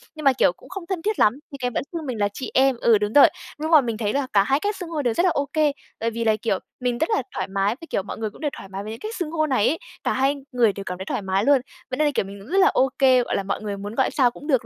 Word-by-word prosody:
nhưng 310 - -8
mà, 275 -2 +5
kiểu, 255 - +3
cũng - - -18
không 385 -1 -6
thân 375 -4 -2
thiết 425 +3 -1
lắm, 210 - +5 0.2
thì 280 - -7
cái 250 -2 -2
vẫn - - -1
xưng 325 -3 -4
mình 250 -4 -3
là 205 - +3
chị 260 - -6
em 265 0 +4
ừ, 230 -2 +5
đúng 210 +1 -2
rồi. 290 - +9 0.3
Nhưng 315 +2 -2
mà 310 -3 +8
mình 230 -3 -3
thấy 210 -2 -1
là 280 -1 0
cả 200 -1 +5
2 270 +6 +1
cách 410 +4 -1
xưng 355 -3 -7
hô 315 -3 -2
đều 240 -4 +1
rất 345 - +1
là - - +5
ô 285 -4 0
kê, 305 -2 +3 0.3
bởi 230 - 0
vì 230 0 -3
là, 220 -1 +3
kiểu, 195 -5 0 0.2
mình 245 -1 -1
rất 320 - 0
là 435 - +2
thoải - - -2
mái 195 +2 0
với, 330 - -10
kiểu, 195 - -1
mọi 200 - -7
người 220 -1 -2
cũng 210 - -16
đều 295 -2 -1
thoải 195 - -10
mái 195 +1 -6
với 215 - -6
cái 225 - -6
cách 440 +2 -5
xưng 335 -4 -3
hô 310 -2 +1
này 260 -7 +2
ấy, 325 - 0 0.2
cả - - +1
hai 270 +2 +2 0.2
người 235 -5 +3
đều 200 - -6
cảm 180 -1 -5
thấy 190 - -6
thoải - - -2
mái 190 +1 0
luôn. 280 -3 +5 0.3
Vậy 255 - -3
nên 305 - +3
là, 290 - +1
kiểu, - - +1
mình 200 +1 -9
cũng 215 - -13
rất 385 - 0
là 390 0 +6
ô 270 -10 +3
kê, 255 -2 +5
gọi - - -2
là, 195 - -1
mọi 200 +2 -3
người 205 -2 -4
muốn 205 +2 -7
gọi 265 - +2
sao 255 -5 +3
cũng 290 - -12
được 260 -7 +2
255 Hz, 350 wpm, -23 LUFS, 210-305 Hz, 0.3 s, rồi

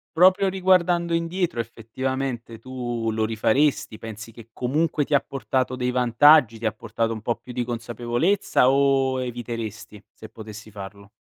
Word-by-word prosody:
Proprio 185 +3 +5
riguardando 180 -2 +2
indietro 165 -5 -1
effettivamente 120 +1 -5
tu 120 -3 -3
lo 110 0 0
rifaresti, 110 +3 +1
pensi 110 +1 -9
che 115 0 -14
comunque 145 +5 0
ti 150 - -4
ha 140 - +5
portato 130 -1 -2
dei 125 0 -1
vantaggi, 125 0 +5
ti 115 - -6
ha 110 - +1
portato 115 +1 -2
un 110 - -7
po' 115 +2 -1
più 125 - -11
di 125 0 -1
consapevolezza 120 - 0
o 135 -1 +2
eviteresti 115 -4 -6
se 110 - -11
potessi 110 0 -11
farlo? 100 0 -10
120 Hz, 150 wpm, -24 LUFS, 115-140 Hz, -, Proprio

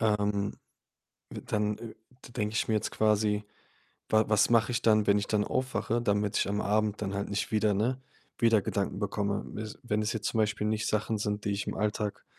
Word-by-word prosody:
Ähm, 105 -2 +1 0.8
dann, 105 0 -2
äh, 115 -2 -8 0.3
d 120 - -14
denke 105 0 -2
ich - - 0
mir 110 - +2
jetzt 105 - 0
quasi, 105 -1 +2 0.6
wa 110 0 +4
was 105 +1 +4
mache 115 +1 +4
ich 120 0 -1
dann, 110 -2 +4
wenn 100 0 +4
ich 100 - -2
dann 105 -1 +1
aufwache, 125 -2 -1
damit 105 -1 +1
ich - - +1
am 105 +1 0
Abend 105 0 +1
dann 95 -1 -2
halt 100 +1 -3
nicht 100 +1 -2
wieder 105 -1 +3
ne, 125 +6 0 0.4
wieder 115 -3 +4
Gedanken 100 -1 -2
bekomme? 100 0 -1
Wes 110 0 -6
wenn 105 -3 0
das 105 0 0
jetzt 110 -3 -3
zum 115 - -2
Beispiel 105 0 +1
nicht 110 0 0
Sachen 110 0 0
sind, 105 0 -2
die 100 - 0
ich 100 0 -3
im - - -3
Alltag 105 0 -2
105 Hz, 210 wpm, -29 LUFS, 105-110 Hz, 0.8 s, wa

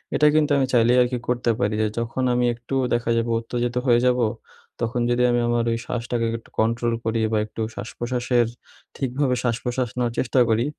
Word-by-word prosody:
এটা 150 - +5
কিন্তু 150 -1 +3
আমি 135 - +3
চাইলেই 120 +1 +4
আরকি 125 0 +1
করতে 120 -1 +1
পারি। 105 -3 +1
যে 110 - +2
যখন 120 +3 -2
আমি 125 0 +2
একটু 120 +3 -6 0.2
দেখা 120 0 0
যাবে 115 0 0
উত্তেজিত 120 +1 -3
হয়ে 120 -1 +5
যাবো, 125 -1 +3 0.6
তখন 115 +1 -1
যদি 120 0 +2
আমি 120 - +2
আমার 120 0 +1
ওই 115 - 0
শ্বাসটাকে 120 -1 -2
একটু 115 - -17
কন্ট্রোল 115 +1 +1
করি 115 0 0
বা 110 - +3
একটু 110 +1 -7
শ্বাসপ্রশ্বাসের 120 -1 -1 0.5
ঠিকভাবে 130 0 0
শ্বাসপ্রশ্বাস 120 +1 -1
নেওয়ার 120 -2 0
চেষ্টা 130 +1 +1
করি 115 +2 +2
120 Hz, 185 wpm, -23 LUFS, 115-125 Hz, 0.6 s, এটা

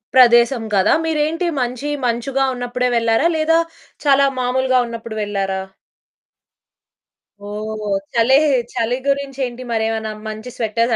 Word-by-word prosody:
ప్రదేశం 240 -1 +5
కదా! 190 - +4
మీరేంటి 320 +2 0
మంచి 250 +4 -3 0.2
మంచుగా 260 +3 0
ఉన్నప్పుడే 245 0 -1
వెళ్లారా? 230 +7 +2
లేదా 325 +1 +3 0.5
చాలా 280 0 +5
మామూలుగా 255 +1 +2
ఉన్నప్పుడు 230 -1 -7
వెళ్లారా? 195 -2 -2 1.9
ఓహ్! 215 0 -4 0.2
చలే 235 +4 +5 0.4
చలి 235 +2 0
గురించేంటి 270 -3 -2
మరేమన్నా 220 -1 -1 0.2
మంచి 215 +3 -6
స్వెటర్స్ 230 +1 0
240 Hz, 105 wpm, -19 LUFS, 225-270 Hz, 1.9 s, ప్రదేశం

